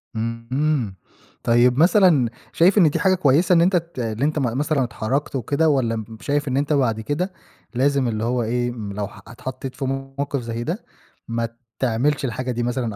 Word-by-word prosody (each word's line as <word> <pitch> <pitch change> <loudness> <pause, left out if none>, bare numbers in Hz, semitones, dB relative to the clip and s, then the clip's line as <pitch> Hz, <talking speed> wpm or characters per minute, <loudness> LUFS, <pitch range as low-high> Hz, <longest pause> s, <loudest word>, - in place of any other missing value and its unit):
اهم. 115 +1 -4
اهم 135 -7 0 0.5
طيب 120 +2 +4
مثلًا 170 - +5 0.2
شايف 185 +5 +4
إن 175 -6 +6
دي - - -2
حاجة 190 -2 +3
كويسة 170 +1 +3
إن 170 - +5
أنت 180 +2 +3
ت 170 -5 -2
اللي 115 +2 -1
أنت 155 0 0
م 125 -3 -1
مثلًا 145 -1 +1
اتحرَّكت 125 +5 -2
وكده 140 +6 +1
والّا 130 -6 +1
مب 110 0 -7
شايف 145 +5 -1
إن 130 0 0
أنت 145 +2 +1
بعد 125 -6 +1
كده 155 - -2 0.4
لازم 135 0 +2
اللي 110 -2 -2
هو 120 +1 0
إيه، 120 +2 -1
لو 105 -3 -4
ح - - -14
اتحطّيت 130 +3 -7
في 140 - -3
موقِف 135 +1 -3
زي 115 0 -4
ده 175 - -4 0.4
ما 115 0 -2 0.3
تعملش 130 +4 +1
الحاجة 125 +1 -3
دي 120 0 -2
مثلًا 120 -3 -2
130 Hz, 190 wpm, -22 LUFS, 115-150 Hz, 0.5 s, إن